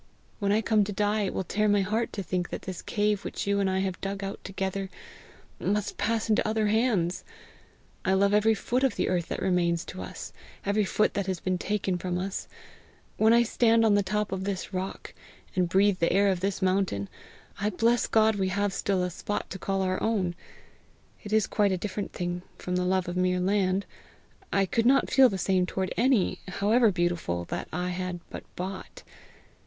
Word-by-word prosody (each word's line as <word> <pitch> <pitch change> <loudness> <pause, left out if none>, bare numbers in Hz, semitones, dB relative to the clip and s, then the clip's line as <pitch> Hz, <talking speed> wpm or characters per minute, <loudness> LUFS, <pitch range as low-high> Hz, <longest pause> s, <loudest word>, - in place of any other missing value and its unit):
When 200 -2 +1
I 215 +2 +3
come 215 -1 +3
to 205 - -4
die, 205 +1 +1
it - - -4
will - - -1
tear 210 +4 0
my 205 -1 +4
heart 220 +4 -1
to 200 - -3
think 180 -1 -2
that - - -6
this 185 -2 -6
cave 210 -1 0
which - - -4
you 200 0 +1
and 195 -1 +2
I 190 0 0
have 190 -2 -3
dug 195 0 -3
out 195 0 -5
together, 195 0 -3 0.7
must 205 0 -1
pass 220 +2 0
into 215 -1 +2
other 215 0 +1
hands! 205 -5 +1 0.8
I 190 - +2
love 200 +1 +3
every 215 +1 +4
foot 250 +5 -1
of 270 - +2
the - - 0
earth 175 -2 0
that - - -4
remains 175 -2 +1
to 95 - -7
us 90 - -7 0.3
every 205 +1 +2
foot 215 +3 +1
that 200 -1 -2
has 185 -2 -2
been 185 -1 -1
taken 195 -3 -1
from 180 0 -2
us. 190 +2 -4 0.7
When 220 +1 +5
I 235 +1 +6
stand 230 -1 +3
on 215 - +4
the 205 - +4
top 210 +2 -1
of 190 0 -2
this 195 0 -4
rock, 185 +1 -5 0.4
and 180 -2 +1
breathe 195 +1 +3
the 170 - +2
air 200 +2 +4
of 185 -2 0
this 195 +1 -2
mountain, 185 - +1 0.5
I 205 - +1
bless 230 +4 +2
God 220 -1 +3
we 190 -1 +1
have 200 +1 0
still 195 -2 0
a 180 - -2
spot 205 +4 -4
to 190 - -5
call 195 0 -1
our 185 0 -1
own. 200 -6 0 0.9
It 205 - -8
is 215 -1 +3
quite 205 -2 +1
a 185 - +1
different 200 +1 -4
thing 175 0 -3 0.2
from 180 - -3
the 180 0 +1
love 185 -1 +1
of 175 - -4
mere 180 0 +2
land; 190 0 +1 0.7
I 195 0 +3
could 230 +5 +1
not 270 +2 +4
feel 265 -2 +7
the 195 - -3
same 185 0 +1
toward 190 0 -2
any, 240 -5 +2
however 215 +4 +3
beautiful, 175 - -1
that - - -3
I 180 +2 -2
had 180 -1 -3
but - - -6
bought. 185 +1 -6
195 Hz, 205 wpm, -27 LUFS, 185-210 Hz, 0.9 s, feel